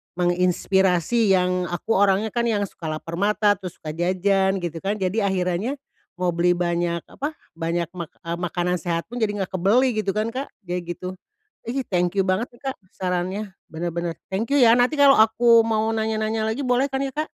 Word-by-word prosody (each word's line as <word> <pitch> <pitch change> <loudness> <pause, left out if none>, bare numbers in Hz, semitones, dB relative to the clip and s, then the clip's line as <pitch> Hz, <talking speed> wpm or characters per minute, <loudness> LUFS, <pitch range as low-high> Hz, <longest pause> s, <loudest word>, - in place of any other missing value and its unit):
menginspirasi 180 +3 +2
yang 180 -1 +2
aku 175 +6 -1
orangnya 200 +2 +3
kan 235 - +2
yang 215 -3 +1
suka 165 - -9
lapar 165 +2 -5
mata 205 +2 +2
terus 185 -3 -9
suka 155 0 -6
jajan 190 +2 +1
gitu 170 -2 -4
kan 200 +2 0
jadi 195 +3 0
akhirannya, 190 +6 -1 0.4
mau 180 -1 +1
beli 175 +1 +3
banyak 175 -1 -1
apa, 295 +3 -5 0.2
banyak 165 0 -2
mak 170 - -5
eee, 170 0 -5
makanan 175 0 -1
sehat 170 0 -2
pun 245 - -4
jadi 205 -3 0
nggak - - -8
kebeli 245 +8 +4
gitu 200 -1 -1
kan, 215 +2 0
Kak, 265 +3 -4 0.2
kayak 175 -1 -4
gitu, 185 0 -6 0.5
ihi 265 +3 -1
thank 175 -2 +1
you 195 - +4
banget 190 +6 +1
nih, - - -23
Kak, - - -12 0.2
sarannya 185 +3 -2 0.2
bener 165 +2 -3
bener 170 -1 -2 0.2
thank 215 +4 -2
you 285 - +4
ya 230 -2 +7
nanti 250 +5 +2
kalau 280 -1 +7
aku 230 +1 +5
mau 220 -1 0
nanya-nanya 220 0 -1
lagi 265 - -4
boleh 250 +1 +2
kan 265 - -1
ya, 275 - -1
Kak? 305 - -1
190 Hz, 195 wpm, -23 LUFS, 175-225 Hz, 0.5 s, ya